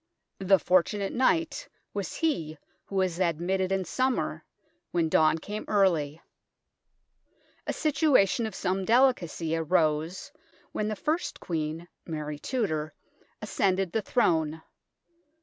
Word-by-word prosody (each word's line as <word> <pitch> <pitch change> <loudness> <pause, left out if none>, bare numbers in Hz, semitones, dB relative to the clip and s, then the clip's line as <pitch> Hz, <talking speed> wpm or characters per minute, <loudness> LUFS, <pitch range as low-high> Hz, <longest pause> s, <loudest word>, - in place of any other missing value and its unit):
The 195 0 +5
fortunate 185 +3 +1
knight 330 - +1 0.2
was - - -4
he 165 - -1 0.3
who 195 - -8
was 185 -2 0
admitted 185 +2 0
in 190 -1 0
summer, 260 +5 -1 0.5
when 170 -2 0
dawn 155 0 +4
came 210 +6 -6
early. 165 -7 +2 1.5
A - - 0
situation 280 - +3
of 215 - -8
some 190 +1 -1
delicacy 185 - +2
arose 160 +1 0 0.4
when 210 - -2
the 215 - -2
first 315 - -2
Queen, 160 0 -3 0.2
Mary 150 -2 -4
Tudor, 155 - -2 0.5
ascended 190 -2 0
the 220 - 0
Throne. 160 -8 +1
185 Hz, 115 wpm, -28 LUFS, 160-215 Hz, 1.5 s, The